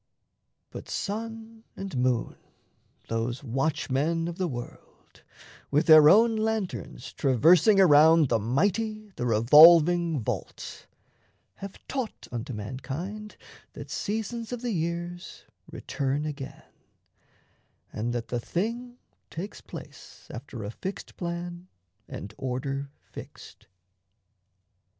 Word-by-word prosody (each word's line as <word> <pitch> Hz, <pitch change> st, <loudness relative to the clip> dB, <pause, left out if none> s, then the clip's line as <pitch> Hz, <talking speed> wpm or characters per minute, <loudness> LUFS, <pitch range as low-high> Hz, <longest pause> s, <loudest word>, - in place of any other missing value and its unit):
But -, -, -9 dB
sun 225 Hz, +1 st, -5 dB
and 195 Hz, -5 st, -6 dB
moon, 125 Hz, -2 st, 0 dB, 0.7 s
those 115 Hz, +4 st, -2 dB
watchmen 145 Hz, +4 st, -1 dB
of 175 Hz, +1 st, -6 dB
the 185 Hz, -, +1 dB
world, 120 Hz, -5 st, -10 dB, 0.5 s
With 150 Hz, +4 st, +2 dB
their 155 Hz, -2 st, +9 dB
own 225 Hz, +5 st, +5 dB
lanterns 195 Hz, -, -3 dB
traversing 165 Hz, -, +4 dB
around 160 Hz, -3 st, +6 dB
The 115 Hz, -, +2 dB
mighty, 205 Hz, -, -1 dB
the 125 Hz, -, -2 dB
revolving 160 Hz, +7 st, +6 dB
vault, 110 Hz, -, -6 dB, 0.7 s
have 195 Hz, 0 st, -8 dB
taught 260 Hz, -5 st, -4 dB
Unto 120 Hz, +3 st, -5 dB
mankind 140 Hz, -, -6 dB, 0.4 s
that -, -, -9 dB
seasons 225 Hz, +2 st, -3 dB
of 245 Hz, -1 st, -5 dB
the 245 Hz, -, -1 dB
years 175 Hz, +1 st, -4 dB, 0.3 s
Return 140 Hz, +2 st, -2 dB
again, 140 Hz, -3 st, -7 dB, 1.3 s
and 115 Hz, +3 st, -2 dB
that 120 Hz, -1 st, -4 dB
the 120 Hz, -, -1 dB
Thing 235 Hz, -, -3 dB, 0.3 s
takes 190 Hz, +6 st, -7 dB
place -, -, -12 dB
After 120 Hz, -3 st, -8 dB
a 100 Hz, -, -5 dB
fixed 190 Hz, +11 st, -7 dB
plan 175 Hz, 0 st, -5 dB, 0.4 s
and 100 Hz, +2 st, -8 dB
order 135 Hz, +2 st, -3 dB
fixed. -, -, -12 dB
165 Hz, 105 wpm, -27 LUFS, 130-200 Hz, 1.3 s, their